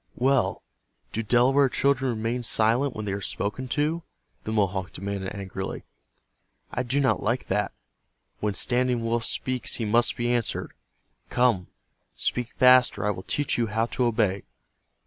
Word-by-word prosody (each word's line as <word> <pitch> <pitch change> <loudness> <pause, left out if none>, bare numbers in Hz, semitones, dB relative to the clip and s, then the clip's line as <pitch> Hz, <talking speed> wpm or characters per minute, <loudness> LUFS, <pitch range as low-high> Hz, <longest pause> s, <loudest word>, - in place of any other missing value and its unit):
"Well, 135 +1 +1 0.5
do 115 - -2
Delaware 125 +5 +4
children 135 0 +1
remain 115 +3 -2
silent 120 +4 +2
when 110 - -4
they 100 - -2
are 100 - -3
spoken 105 +7 -3
to?" 155 +5 0 0.4
the 110 - -3
Mohawk 95 -3 0
demanded, 100 +1 -4
angrily. 95 -1 -5 0.9
"I - - -1
do 130 +3 0
not 135 -2 +2
like 120 +4 -1
that. 105 +2 0 0.7
When 105 -2 -1
Standing 125 +2 +1
Wolf 115 0 0
speaks 130 -1 -2
he 115 - -2
must 115 +2 +2
be 120 +1 0
answered. 115 -5 -2 0.6
Come, 120 -8 +2 0.5
speak 120 -1 -2
fast 125 -2 +6
or 100 - -3
I 105 - +2
will 95 - -6
teach 140 +7 -1
you 115 - +1
how 110 +2 0
to 125 +1 -1
obey." 105 -5 +1
115 Hz, 155 wpm, -26 LUFS, 105-125 Hz, 0.9 s, fast